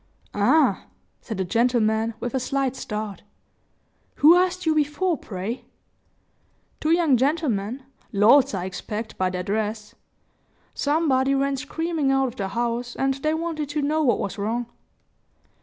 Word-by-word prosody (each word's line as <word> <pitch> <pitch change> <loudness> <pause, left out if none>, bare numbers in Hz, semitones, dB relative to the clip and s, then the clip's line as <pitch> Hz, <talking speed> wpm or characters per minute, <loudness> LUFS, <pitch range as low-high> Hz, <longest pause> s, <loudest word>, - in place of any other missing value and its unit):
"Ah!" 260 +10 +3 0.3
said 220 - -6
the 190 - -1
gentleman, 225 +1 +1
with 245 - -4
a 265 - +1
slight 270 0 -1
start. 210 -5 -5 0.9
"Who 315 +4 +7
asked 365 0 +1
you 320 - +3
before, 310 +4 +1
pray?" 210 0 -6 1.1
"Two 310 - -1
young 325 -6 +4
gentlemen; 260 -4 -1 0.3
lords, 220 +3 +5
I 180 -1 -3
expect, 210 +4 -5
by 185 -1 0
their 180 0 -3
dress. 210 +2 -3 0.8
Somebody 275 -3 +1
ran 275 0 +1
screaming 300 +1 -1
out 270 -1 +2
of 240 - -12
the 195 -5 -3
house, 240 +2 -2
and 270 0 +1
they 305 +4 -1
wanted 320 -3 -3
to 295 0 -2
know 310 +2 +1
what 260 -6 +3
was 200 +2 -4
wrong." 230 +4 -1
260 Hz, 140 wpm, -24 LUFS, 220-300 Hz, 1.1 s, Who